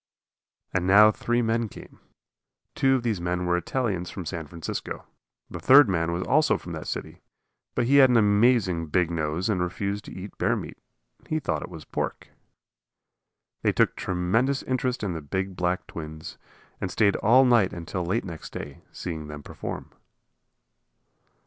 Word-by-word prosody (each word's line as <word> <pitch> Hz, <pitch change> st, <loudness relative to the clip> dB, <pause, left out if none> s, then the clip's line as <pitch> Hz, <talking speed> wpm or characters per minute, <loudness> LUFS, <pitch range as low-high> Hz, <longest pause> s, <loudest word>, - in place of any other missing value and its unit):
And 90 Hz, -1 st, 0 dB
now 105 Hz, +3 st, +8 dB
three 120 Hz, +3 st, 0 dB
men 115 Hz, 0 st, 0 dB
came. -, -, -13 dB, 0.7 s
Two 135 Hz, 0 st, +3 dB
of 125 Hz, -, -1 dB
these 110 Hz, -7 st, -1 dB
men 90 Hz, +1 st, -1 dB
were 90 Hz, 0 st, +2 dB
Italians 90 Hz, -1 st, -2 dB
from 90 Hz, -1 st, -7 dB
San 80 Hz, -1 st, -5 dB
Francisco. 85 Hz, +2 st, -6 dB, 0.4 s
The -, -, -7 dB
third 135 Hz, 0 st, +7 dB
man 85 Hz, -3 st, 0 dB
was 85 Hz, +2 st, -2 dB
also 155 Hz, +8 st, +3 dB
from 90 Hz, -, -9 dB
that 80 Hz, -2 st, -6 dB
city, -, -, -5 dB, 0.5 s
but 120 Hz, -, +1 dB
he 140 Hz, +4 st, +4 dB
had 135 Hz, -2 st, +8 dB
an 125 Hz, -, +4 dB
amazing 105 Hz, -5 st, +3 dB
big 85 Hz, +2 st, +1 dB
nose 80 Hz, +2 st, -1 dB
and 100 Hz, -5 st, 0 dB
refused 100 Hz, +3 st, -3 dB
to -, -, -9 dB
eat 95 Hz, +2 st, -8 dB
bear -, -, +2 dB
meat. -, -, -7 dB, 0.5 s
He 155 Hz, -, +1 dB
thought -, -, -2 dB
it -, -, -7 dB
was -, -, -10 dB
pork. -, -, -4 dB, 1.3 s
They -, -, +2 dB
took -, -, +2 dB
tremendous 105 Hz, +10 st, 0 dB
interest 130 Hz, -2 st, -1 dB
in 95 Hz, -4 st, -1 dB
the 80 Hz, -, -5 dB
big 95 Hz, +6 st, -3 dB
black 90 Hz, +1 st, -1 dB
twins, 80 Hz, -1 st, -8 dB, 0.4 s
and -, -, -2 dB
stayed 100 Hz, -2 st, +2 dB
all 125 Hz, +5 st, +5 dB
night 120 Hz, -7 st, +4 dB
and 85 Hz, -2 st, -8 dB
till 90 Hz, -, -2 dB
late 100 Hz, +7 st, -1 dB
next 85 Hz, -3 st, -8 dB
day, 70 Hz, 0 st, -8 dB
seeing 80 Hz, -3 st, -6 dB
them 75 Hz, -1 st, -8 dB
perform. -, -, -7 dB
95 Hz, 170 wpm, -26 LUFS, 85-115 Hz, 1.3 s, now